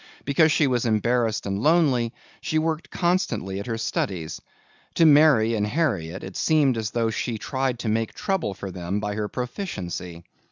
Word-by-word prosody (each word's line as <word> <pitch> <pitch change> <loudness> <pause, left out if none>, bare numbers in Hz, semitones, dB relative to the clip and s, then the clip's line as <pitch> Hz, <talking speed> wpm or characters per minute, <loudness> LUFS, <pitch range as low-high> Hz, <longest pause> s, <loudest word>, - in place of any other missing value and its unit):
Because 155 +3 +4
she 155 - +3
was 125 -3 +1
embarrassed 115 +1 +1
and 100 0 -2
lonely 140 -7 +3 0.3
she 155 - -1
worked 160 0 -1
constantly 170 - -1
at 100 - -6
her 115 -2 -2
studies. 90 -7 -3 0.5
To 165 - +5
Mary 145 -7 +6
and 105 -2 0
Harriet, 95 - -1
it 95 - -8
seemed 150 -5 +3
as 110 -1 -2
though 115 -1 0
she 115 +1 -2
tried 130 +1 -2
to 115 - -5
make 110 +1 -1
trouble 185 - -1
for 95 -1 -6
them 90 +2 -3
by 105 -1 -3
her 105 0 -2
proficiency. 95 - -5
115 Hz, 170 wpm, -24 LUFS, 105-150 Hz, 0.5 s, Mary